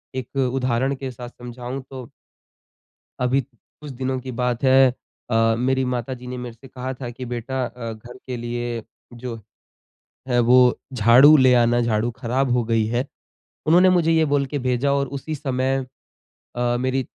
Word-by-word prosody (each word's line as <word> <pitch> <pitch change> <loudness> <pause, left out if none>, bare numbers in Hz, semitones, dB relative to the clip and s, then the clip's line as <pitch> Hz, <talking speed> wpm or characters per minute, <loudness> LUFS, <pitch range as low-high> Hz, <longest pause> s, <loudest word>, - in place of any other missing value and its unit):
एक 130 +1 -6 0.2
उदाहरण 130 +1 0
के 130 -1 -6
साथ 120 0 -9
समझाऊँ 125 +2 -7
तो 130 -2 -8 1.1
अभी, 125 +2 +2
कुछ 140 +3 -14
दिनों 130 0 -3
की 130 0 -7
बात 125 +1 -2
है। 130 -1 +5 0.4
अ, 115 -1 +3
मेरी 130 +2 +1
माताजी 125 0 -4
ने 125 - -5
मेरे 125 -2 -6
से 135 +4 -15
कहा 130 +1 -5
था 125 -1 -7
कि 125 +2 -8
बेटा 125 +2 -3
अ, 120 -1 -6
घर 120 +3 -12
के 125 - -4
लिए 120 -1 -4 0.3
जो 120 -1 -6 0.9
है 120 -1 +2
वो 120 +2 +5 0.3
झाड़ू 125 +6 +7
ले 130 -3 +5
आना, 120 0 +3
झाड़ू 115 0 0
ख़राब 130 +2 -1
हो 125 - +2
गयी 115 -1 +1
है। 120 +4 -1 0.6
उन्होंने 180 +3 +6
मुझे 175 -3 +3
ये 160 -1 +3
बोल 140 -1 +2
के 145 +1 -4
भेजा 130 +2 0
और 140 0 0
उसी 155 +3 -5
समय 135 -1 -1 0.7
अ, 120 0 +1
मेरी 130 +1 0
125 Hz, 170 wpm, -22 LUFS, 120-135 Hz, 1.1 s, झाड़ू